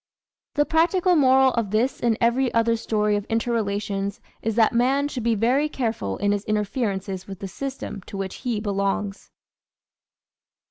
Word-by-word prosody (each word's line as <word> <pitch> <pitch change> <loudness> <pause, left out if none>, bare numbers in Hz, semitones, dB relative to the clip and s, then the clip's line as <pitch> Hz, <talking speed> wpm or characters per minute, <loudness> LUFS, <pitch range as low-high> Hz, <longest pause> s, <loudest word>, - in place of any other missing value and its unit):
The 295 - +3
practical 350 +3 +3
moral 265 -3 +5
of 230 -4 -1
this 225 +6 0
and 230 -2 +1
every 240 +2 +2
other 230 0 +3
story 210 -2 0
of 205 0 -3
inter 230 +1 0
relations 200 -2 -2 0.2
is 225 -1 -1
that 225 0 +4
man 265 +4 +2
should 265 -4 -5
be 230 0 +1
very 255 +8 +2
careful 225 - -2
in 205 +1 +1
his 205 -1 -1
interferences 200 -3 -2
with 195 -1 -7
the 195 - -6
system 265 0 -6
to 200 - -7
which 195 -1 -4
he 240 -5 -2
belongs. 200 -1 -2
225 Hz, 160 wpm, -24 LUFS, 200-255 Hz, 0.2 s, moral